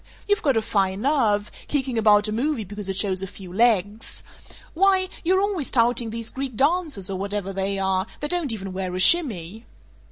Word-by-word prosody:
You've 410 +1 +2
got 275 -6 +2
a 220 - +1
fine 195 -2 0
nerve, 225 -7 +1 0.2
kicking 265 -4 -2
about 210 -1 +4
a - - -3
movie 250 +2 -1
because 205 0 -7
it 190 - -3
shows 195 -2 +1
a 195 - -4
few 185 -2 -11
legs! 215 -1 0 0.5
Why, 375 +1 +3
you're 375 +3 +2
always 395 -8 -1
touting 235 -1 +1
these 230 0 -6
Greek 265 -2 -5
dancers, 285 - +1
or 190 - -4
whatever 200 0 -3
they 195 +1 -1
are, 190 0 0
that 295 - -2
don't 345 -7 -1
even 195 -4 -6
wear 185 -1 -4
a - - -3
shimmy!" 220 - +2
220 Hz, 190 wpm, -23 LUFS, 195-280 Hz, 0.5 s, about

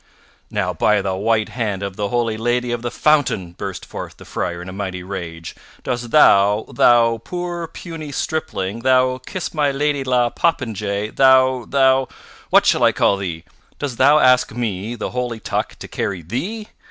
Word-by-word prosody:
"Now, - - -1
by 105 -2 +2
the 95 - -1
white 110 +2 +1
hand 105 -5 -3
of 100 -1 -5
the 100 0 -2
holy 120 -2 0
Lady 120 +2 -1
of 120 -1 -2
the 120 - -3
Fountain!" 135 - +1
burst 85 - -6
forth - - -8
the - - -13
Friar 85 -1 -3
in 90 - -8
a 95 - -7
mighty 95 -2 -5
rage, 85 -4 -7 0.3
"dost 120 -2 -3
thou, 105 -6 +5
thou 115 -1 +4
poor 175 -1 -4
puny 160 -3 -8
stripling, 115 -9 -3
thou 130 +1 +2
kiss 185 +7 -5
my 150 -3 +2
lady 140 0 0
la 125 -2 +1
poppenjay; 110 - -1
thou 130 -2 +4
thou 135 -1 +3 0.4
What - - +5
shall - - +3
I - - +5
call 100 - +2
thee? 85 -4 -5 0.3
Dost 135 -5 -5
thou 145 +3 +6
ask 125 -3 +4
me, 110 -1 -3
the - - -5
holy 125 -2 -3
Tuck, - - -3
to - - -9
carry 95 -4 -3
thee? 180 - -4
120 Hz, 175 wpm, -20 LUFS, 100-135 Hz, 0.4 s, thou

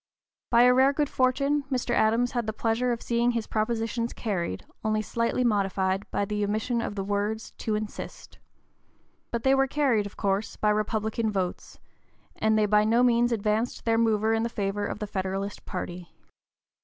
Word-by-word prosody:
By 235 0 +6
a 250 0 +6
rare 265 +2 +4
good 290 0 0
fortune, 275 +3 +1
Mr. 250 -2 -1
Adams 235 +1 +2
had 240 -3 -2
the 220 - -1
pleasure 230 +3 0
of 235 - -3
seeing 235 +1 +1
his 230 -2 -2
propositions 230 +1 -1
carried, 175 - -3 0.2
only 215 -1 0
slightly 230 +3 0
modified 195 -3 0
by 200 - -1
the 210 +1 -2
omission 215 +4 0
of 205 - -4
the 195 - -2
words 205 +2 -2
"to 215 - -1
insist." 210 0 -7 0.9
But 235 -1 -3
they 265 - +4
were 270 0 +3
carried, 260 -7 +1
of 205 - -14
course, 200 +1 -1
by 210 - +1
Republican 220 +1 -1
votes, 190 -3 -3 0.6
and 220 0 +2
they 215 - +3
by 210 0 +4
no 230 +3 +3
means 240 0 +3
advanced 220 +1 -1
their 225 -1 +2
mover 220 -1 +2
in 225 - +1
the 230 - -1
favor 205 -1 -2
of - - -4
the 210 - -4
Federalist 195 0 -4
party. 180 -2 -6
220 Hz, 180 wpm, -27 LUFS, 205-235 Hz, 0.9 s, By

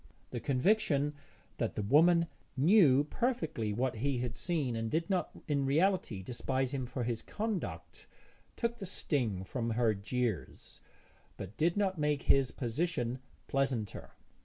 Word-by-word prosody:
The 120 - -3
conviction 145 - +2 0.4
that - - -2
the 105 - -2
woman 170 +9 +5 0.3
knew 145 -3 +6
perfectly 155 - -1
what 120 +2 -1
he 135 +3 0
had 120 -1 -3
seen 150 -9 -1
and 115 0 -2
did 165 - -1
not 185 -2 +1 0.2
in 145 -3 +1
reality 145 - +1
despise 130 +3 -2
him 130 -2 -2
for 125 0 -3
his 115 -1 -2
conduct, 215 -3 -4 0.5
took 235 0 -1
the 195 -4 -6
sting 120 - -1
from 115 +4 -3
her 115 -1 +2
jeers 105 - -3 0.6
but 100 +2 -7
did 170 +4 +1
not 190 -4 +1
make 150 -1 +1
his 135 -2 +4
position 125 -1 -2 0.3
pleasanter. 130 -7 -2
135 Hz, 140 wpm, -32 LUFS, 120-170 Hz, 0.6 s, knew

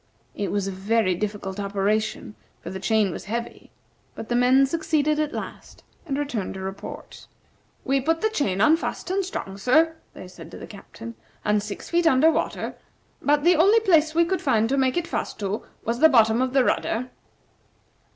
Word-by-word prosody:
It 200 -1 -3
was 200 -1 -1
a - - -2
very 195 +1 +1
difficult 200 0 -4
operation, 205 +2 -1 0.3
for - - -8
the 190 - -5
chain 210 0 +1
was - - -7
heavy, 235 +3 -5 0.5
but 220 - -8
the 240 - 0
men 255 +2 +5
succeeded 305 0 0
at 305 -1 0
last, - - -8 0.2
and 275 -2 -2
returned 280 -11 -3
to - - -6
report. 190 +1 -8 0.6
"We 270 0 +1
put 325 +4 0
the 440 - +1
chain 200 - 0
on, 305 +8 +5
fast 355 - -5
and 390 +1 +1
strong 195 - -6
sir," 315 +9 +3 0.2
they - - -9
said 180 - -12
to - - -10
the - - -8
Captain; 225 +3 -10 0.3
"and 210 0 +2
six 205 -1 -8
feet 340 -1 +3
under 315 +2 +5
water. - - -2 0.5
But 290 0 +2
the 350 +2 +5
only 395 +8 +5
place 320 -6 +3
we 335 0 +4
could 375 +2 -1
find 225 -5 +2
to 275 - +1
make 260 +2 +1
it 345 - 0
fast 340 - -4
to 200 +1 -3 0.2
was 235 +2 -1
the 320 - +7
bottom 225 -3 +4
of 260 0 -1
the 270 -2 +4
rudder." 250 +1 -1
250 Hz, 190 wpm, -24 LUFS, 205-310 Hz, 0.6 s, the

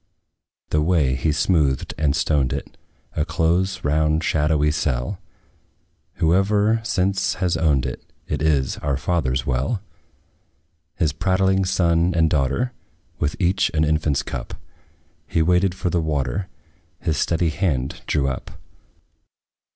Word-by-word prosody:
The 75 - +2
way, 75 -5 +2
he 70 +4 0
smoothed 75 -4 +1
and 75 -2 +1
stoned 70 -2 +1
it, - - -6 0.4
A 75 - +1
close, 85 +4 0
round, 75 +2 +1
shadowy 75 -1 +2
cell; 75 +4 -1 0.9
Whoever 100 +6 +2
since 95 -3 0
has 90 -3 0
owned 75 -5 +2
it, - - -5 0.2
It - - -2
is 75 -4 +1
our 70 -2 -1
father's 70 -5 -1
well! 65 - 0 1.2
His 80 -5 0
prattling 95 +3 +2
son 85 -1 +2
and 80 -2 +3
daughter, 75 - +1 0.5
With 75 0 -1
each 95 +1 +2
an 80 - +3
infant's 75 -2 +1
cup, 60 - -6 0.8
We 80 - +4
waited 90 +2 +2
for 90 -2 -2
the 85 - +1
water, 75 +2 -1 0.5
His 80 -3 -1
steady 85 0 +1
hand 75 -6 -1
drew 70 -3 +1
up. 65 - -4
80 Hz, 130 wpm, -22 LUFS, 75-90 Hz, 1.2 s, We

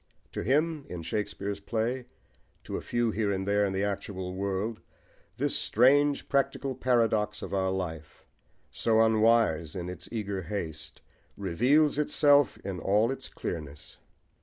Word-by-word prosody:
To - - -4
him 150 +3 +1
in 85 -2 -6
Shakespeare's 100 +1 -3
play, 120 +4 -2 0.6
to - - -5
a - - -3
few 120 -1 0
here 105 -1 0
and 95 0 -2
there 100 0 +3
in - - -2
the 95 +1 -1
actual 100 -2 -3
world, 100 +3 -2 0.6
this - - 0
strange 140 +5 +3
practical 140 -1 0
paradox 115 -4 +1
of - - -6
our 95 -1 +1
life, 80 -5 -5 0.5
so 110 -1 +2
unwise 110 -8 +3
in 90 -1 -4
its 90 -1 -9
eager 100 -4 -3
haste, 85 -4 -6 0.3
reveals 130 - +2
itself 145 -2 +4
in 95 -3 -4
all 105 +7 +2
its 135 0 -6
clearness. 75 -3 -7
105 Hz, 140 wpm, -29 LUFS, 95-120 Hz, 0.6 s, itself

